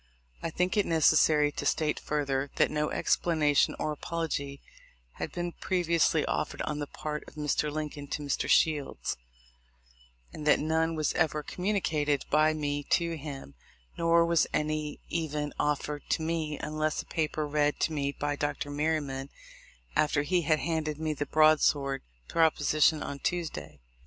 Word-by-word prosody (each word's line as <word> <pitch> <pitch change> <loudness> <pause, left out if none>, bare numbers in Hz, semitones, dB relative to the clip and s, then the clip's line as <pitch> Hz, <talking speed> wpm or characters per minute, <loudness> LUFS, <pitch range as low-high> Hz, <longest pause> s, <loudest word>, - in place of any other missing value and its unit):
I - - -2
think 180 +5 0
it 205 - +3
necessary 155 -2 +4
to - - -5
state 155 -1 +1
further, 140 -2 -1
that - - +3
no 150 0 0
explanation 150 -4 +2
or 155 - -1
apology 150 -3 -3 0.6
had - - -3
been 175 0 -3
previously 170 -3 +1
offered - - -2
on 150 -1 -3
the 145 - -3
part 150 +1 -5
of - - -14
Mr. 150 0 0
Lincoln 150 -1 -5
to 150 - -4
Mr. 140 - -1
Shields, 150 -4 +2 1.2
and 150 - -6
that - - +6
none 160 +1 +1
was 155 -1 0
ever 155 -2 +1
communicated 160 -8 0
by 155 +1 +5
me 145 -2 -2
to 170 -1 +1
him, 140 - -8 0.4
nor 170 0 +4
was 170 -1 +3
any 150 -1 -2
even 150 -3 -2
offered 150 0 -1
to 160 - +1
me, 160 -2 -2
unless 155 0 -2
a - - -26
paper 155 -1 -1
read 150 0 +1
to 160 - +1
me 140 -2 -1
by 145 0 -2
Dr. 145 0 -3
Merryman 145 -3 -1 0.7
after 150 -1 +2
he 180 +4 +1
had 155 0 +2
handed 155 -2 -2
me 155 0 -1
the 145 -1 -3
broadsword 150 -3 +3 0.3
proposition 155 -1 +3
on 140 - -5
Tuesday. 80 - -3
150 Hz, 150 wpm, -29 LUFS, 145-160 Hz, 1.2 s, that